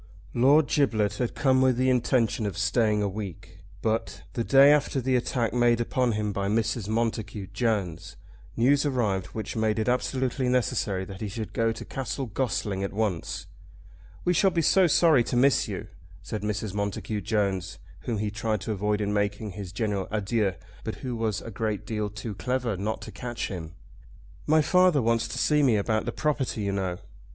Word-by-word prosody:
Lord 140 +6 +5
Giblet 110 -8 +1
had 125 -2 -1
come 130 -2 +3
with 130 -2 +3
the 130 +1 +3
intention 120 -3 +1
of 100 - -5
staying 110 -1 +2
a - - +1
week, 95 -3 -7 0.2
but, 115 0 -1
the 115 - -1
day 135 +3 +7
after 145 -2 +2
the 130 0 +1
attack 120 -3 0
made 120 -1 +3
upon 120 0 +1
him 105 -1 -1
by 100 0 -1
Mrs. 110 0 0
Montacute 110 -3 -2
Jones, 105 -7 -1 0.4
news 140 +5 +4
arrived 110 -10 0
which 110 - -6
made 110 -1 +1
it 110 - -1
absolutely 130 +1 0
necessary 105 -6 0
that 95 0 -9
he 110 - -2
should 110 +2 -6
go 115 0 +1
to 115 - -7
Castle 135 +1 -4
Gossling 105 -4 -2
at 100 - -3
once. 100 -6 -2 0.8
"We 180 - +3
shall 190 +3 +4
be 170 -3 0
so 185 +3 +5
sorry 155 -5 +5
to - - -2
miss 135 +3 +4
you," - - -5 0.4
said 105 - -4
Mrs. 105 -1 -3
Montacute 105 +1 -3
Jones, 100 -5 -1 0.2
whom 115 - -3
he 105 0 -2
tried 110 -1 -2
to 110 - -3
avoid 105 +1 0
in 105 0 -1
making 105 +1 -1
his 95 -2 -7
general 100 -2 -2
adieux, 105 -2 0 0.3
but - - -4
who 125 -2 -2
was 110 -3 -1
a 115 - -8
great 110 0 -2
deal 105 -2 -2
too 105 +1 -6
clever 125 +1 -1
not 105 +4 -3
to - - -8
catch 120 -1 -4
him. 85 -4 -7 0.7
"My 155 0 +4
father 180 -2 +4
wants 115 -1 +1
to - - -6
see 150 -1 +3
me 130 -6 +4
about 110 +1 0
the - - -2
property, 145 -7 -1
you 100 -1 -1
know." 95 -3 -2
110 Hz, 185 wpm, -27 LUFS, 100-125 Hz, 0.8 s, day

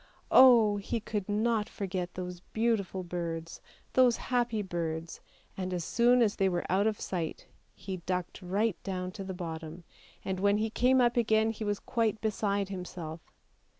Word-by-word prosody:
Oh, 230 -5 +7
he 200 +3 -2
could 210 -2 -4
not 215 +1 +1
forget 185 -3 -4
those 180 -1 -5
beautiful 220 -5 0
birds, 170 -1 -5 0.3
those 250 -2 +5
happy 240 -4 0
birds, 165 -3 -4 0.3
and 185 -1 -3
as 175 - -2
soon 240 +6 +4
as 210 -2 0
they 195 -1 +3
were 175 -1 -2
out 200 +3 +3
of 215 -2 -1
sight 170 -4 -4 0.3
he 190 -1 -5
ducked 180 +2 -4
right 195 +3 0
down 185 -2 -4
to 195 +1 -7
the 190 -1 -5
bottom, 165 -1 -6 0.4
and 190 -1 -2
when 200 +1 +3
he 220 +1 -1
came 255 +3 +4
up 240 0 +2
again 220 -1 +3
he 220 0 -6
was 205 -1 -1
quite 225 -2 0
beside 200 -2 -1
himself. 175 -4 -6
200 Hz, 165 wpm, -30 LUFS, 180-220 Hz, 0.4 s, Oh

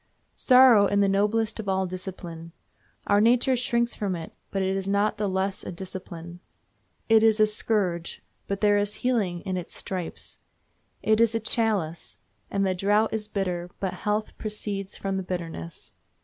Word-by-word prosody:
Sorrow 250 -6 +6
is 200 +1 +1
the 200 - +4
noblest 210 +3 +1
of 205 -3 -4
all 190 0 +1
discipline. 175 -3 -7 0.5
Our 205 0 +4
nature 245 +3 +4
shrinks 235 -1 0
from 195 -3 -2
it, 165 -1 -7 0.2
but 195 -1 -1
it 190 0 0
is 195 0 -2
not 205 +2 +1
the 210 -2 -1
less 190 +1 -1
a - - -5
discipline. 175 -2 -7 0.7
It 225 -1 +6
is 220 -1 +4
a 215 - +7
scourge, 205 -5 0 0.2
but 200 0 -3
there 205 -1 +4
is 205 +1 -1
healing 200 -9 +1
in 185 -2 -3
its 175 - -6
stripes. 185 -3 -5 0.6
It 220 +1 +3
is 230 -1 +3
a - - +2
chalice, 210 -7 -1 0.3
and 195 0 0
the 190 - +1
draught 205 +4 +2
is 215 -1 -2
bitter, 180 -4 -2
but 190 -2 -2
health 210 +1 -2
proceeds 205 -2 -4
from 195 -1 -2
the - - -1
bitterness. 165 - -6
200 Hz, 170 wpm, -26 LUFS, 185-215 Hz, 0.7 s, a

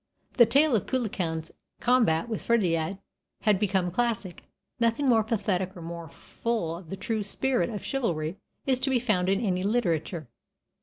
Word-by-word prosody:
The 235 -3 +6
tale 280 +2 +4
of 205 - 0
Cuchulainn's 180 -10 -2 0.3
combat 235 -8 +3
with 225 -2 -3
Ferdiad 180 -6 +1 0.4
has 210 -4 +3
become 190 -4 +1
classic; 215 -4 -2 0.3
nothing 235 +4 +2
more 225 -3 +5
pathetic 195 -4 -1
or 170 - -8
more 170 -1 -7
full 220 -6 -3
of 170 -1 -11
the 195 - -5
true 220 +1 -2
spirit 250 +6 0
of 210 -3 -5
chivalry 175 - -1 0.3
is 260 -2 +2
to 270 - 0
be 260 - +3
found 210 -7 +1
in 195 0 +2
any 185 -2 0
literature. 175 - 0
205 Hz, 160 wpm, -27 LUFS, 175-235 Hz, 0.4 s, The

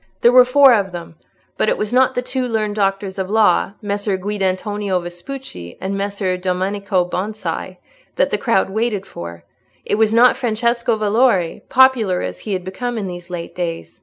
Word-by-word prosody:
There 240 - +6
were 250 0 +7
four 270 +1 +6
of 200 -4 +1
them; 170 -2 -8 0.4
but 215 - +2
it - - 0
was 210 +2 -3
not 260 +1 +3
the 250 - -1
two 255 0 -2
learned 215 -3 -1
doctors 195 -1 -1
of 190 0 -3
law, 210 -2 +3
Messer 205 -1 -1
Guidantonio 200 0 -1
Vespucci 175 - -8
and 195 +1 -3
Messer 200 -2 -2
Domenico 190 +1 -1
Bonsi, 185 -1 -4 0.4
that - - +1
the - - +1
crowd 195 -5 +1
waited 215 -2 -1
for; 85 0 -9 0.4
it 210 - 0
was 220 -1 +3
not 240 +2 +5
Francesco 235 -1 0
Valori, 210 -4 +1
popular 245 -8 +4
as 90 0 -5
he 210 - -4
had 185 -1 -2
become 240 +6 -4
in 210 - -3
these 175 -1 -8
late 175 -2 -6
days. 170 -2 -5
205 Hz, 175 wpm, -19 LUFS, 185-230 Hz, 0.4 s, were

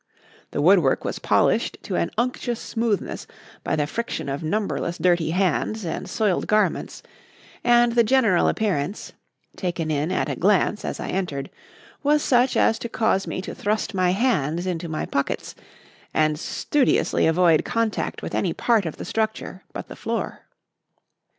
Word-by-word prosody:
The 145 - -2
woodwork 175 -6 +4
was - - -3
polished - - +2
to - - -3
an 85 0 0
unctuous 240 0 -1
smoothness 225 -3 -2 0.4
by - - 0
the 150 -2 +1
friction 230 -2 -4
of 140 +1 -3
numberless 175 0 -2
dirty 175 -3 +2
hands 195 +4 0
and 165 - -4
soiled 210 -5 0
garments, 215 0 0 0.6
and 240 0 +5
the 235 0 +4
general 225 -6 +3
appearance 195 -3 -1 0.4
taken 170 -4 -2
in 150 +3 0
at 185 - 0
a - - -2
glance 205 +2 +2
as - - -4
I - - -4
entered 170 -8 -3 0.5
was 295 +1 +2
such 250 0 +3
as 225 - +3
to 235 - -5
cause 220 -4 +1
me 185 - -4
to - - -6
thrust 215 +1 -1
my 185 -2 +2
hands 180 - +1
into 175 -2 -3
my 155 - -2
pockets 140 - -2 0.6
and 155 -1 +2
studiously 280 - +1
avoid 165 -1 +4
contact 230 -2 -2
with - - -5
any - - 0
part 225 -7 +2
of 160 - -6
the - - -6
structure 220 -4 -2
but - - -7
the - - -9
floor. - - -4
190 Hz, 155 wpm, -23 LUFS, 160-225 Hz, 0.6 s, and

